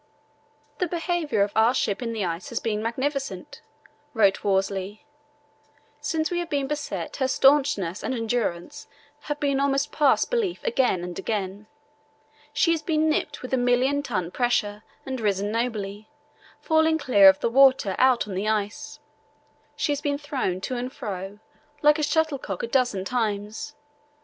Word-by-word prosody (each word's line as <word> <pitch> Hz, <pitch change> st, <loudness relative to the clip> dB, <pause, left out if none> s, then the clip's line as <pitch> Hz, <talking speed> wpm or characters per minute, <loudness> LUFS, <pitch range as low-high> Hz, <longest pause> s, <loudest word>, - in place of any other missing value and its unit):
"The 360 Hz, -, +1 dB
behaviour 335 Hz, -, 0 dB
of 200 Hz, -, -2 dB
our 225 Hz, +3 st, +4 dB
ship 200 Hz, -3 st, -1 dB
in 235 Hz, -2 st, -3 dB
the 215 Hz, -4 st, -2 dB
ice 170 Hz, +1 st, -4 dB
has -, -, -2 dB
been 215 Hz, -2 st, -2 dB
magnificent," 270 Hz, +5 st, -3 dB, 0.5 s
wrote 200 Hz, -3 st, +3 dB
Worsley. 195 Hz, +2 st, -1 dB, 0.9 s
"Since 320 Hz, 0 st, -1 dB
we 350 Hz, -, 0 dB
have 345 Hz, -1 st, -4 dB
been 280 Hz, -2 st, 0 dB
beset 270 Hz, -, -4 dB
her 265 Hz, -, +1 dB
staunchness 260 Hz, -, +2 dB
and 260 Hz, -, -2 dB
endurance 225 Hz, -7 st, -3 dB, 0.4 s
have 295 Hz, -1 st, -3 dB
been 280 Hz, -2 st, +1 dB
almost 280 Hz, +1 st, +1 dB
past 295 Hz, -3 st, +2 dB
belief 445 Hz, -8 st, -1 dB
again 255 Hz, -, +1 dB
and 175 Hz, 0 st, -6 dB
again. 200 Hz, 0 st, -3 dB, 0.8 s
She 330 Hz, +3 st, +2 dB
has 330 Hz, -2 st, 0 dB
been 315 Hz, -1 st, +1 dB
nipped 295 Hz, -2 st, -2 dB
with 255 Hz, -, -6 dB
a -, -, +4 dB
million 250 Hz, +3 st, +2 dB
ton 185 Hz, -, -3 dB
pressure 210 Hz, -4 st, 0 dB, 0.2 s
and 260 Hz, -2 st, -4 dB
risen 205 Hz, -1 st, 0 dB
nobly, 215 Hz, -3 st, -3 dB, 0.5 s
falling 315 Hz, 0 st, +2 dB
clear 205 Hz, -10 st, +6 dB
of 190 Hz, -, +3 dB
the -, -, 0 dB
water 260 Hz, -6 st, +5 dB
out 255 Hz, -4 st, +4 dB
on 200 Hz, -, -6 dB
the 195 Hz, +3 st, -2 dB
ice. 220 Hz, +8 st, -3 dB, 0.8 s
She -, -, -1 dB
has 290 Hz, 0 st, -1 dB
been 285 Hz, -1 st, -1 dB
thrown 270 Hz, -11 st, -3 dB
to 255 Hz, +5 st, -3 dB
and 250 Hz, +1 st, -4 dB
fro 195 Hz, -5 st, -6 dB, 0.5 s
like 300 Hz, +1 st, +5 dB
a -, -, 0 dB
shuttlecock 300 Hz, -, -1 dB
a -, -, -1 dB
dozen 240 Hz, -7 st, 0 dB
times. 220 Hz, +5 st, -3 dB
245 Hz, 160 wpm, -25 LUFS, 205-290 Hz, 0.9 s, clear